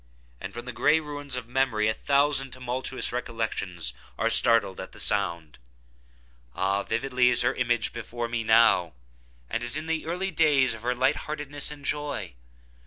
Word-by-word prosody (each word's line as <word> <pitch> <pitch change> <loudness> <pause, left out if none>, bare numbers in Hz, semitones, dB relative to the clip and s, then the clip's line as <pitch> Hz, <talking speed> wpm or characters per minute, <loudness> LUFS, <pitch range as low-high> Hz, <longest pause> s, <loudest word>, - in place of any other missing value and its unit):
—and - - -6
from 120 +1 -8
the 125 - -5
gray 150 +7 +3
ruins 145 -3 -6
of 125 -2 -5
memory 125 -4 +1
a 110 - +2
thousand 140 +1 +1
tumultuous 130 +1 -3
recollections 110 - -3 0.2
are - - +1
startled 110 -5 +4
at 95 - -8
the - - -12
sound! 85 - -1 1.0
Ah, 95 +1 +1
vividly 125 +3 +1
is 125 - +4
her 120 - +2
image 120 -2 0
before 120 0 -4
me 115 -1 -2
now, 110 -7 +4 0.5
as 120 - -1
in 155 - -4
the 160 -1 -2
early 185 +3 -2
days 150 -6 +3
of 110 - -9
her 125 +1 -1
light 130 +2 +2
heartedness 145 -1 -3
and 145 -1 -10
joy! 145 - -3
125 Hz, 165 wpm, -27 LUFS, 110-145 Hz, 1.0 s, startled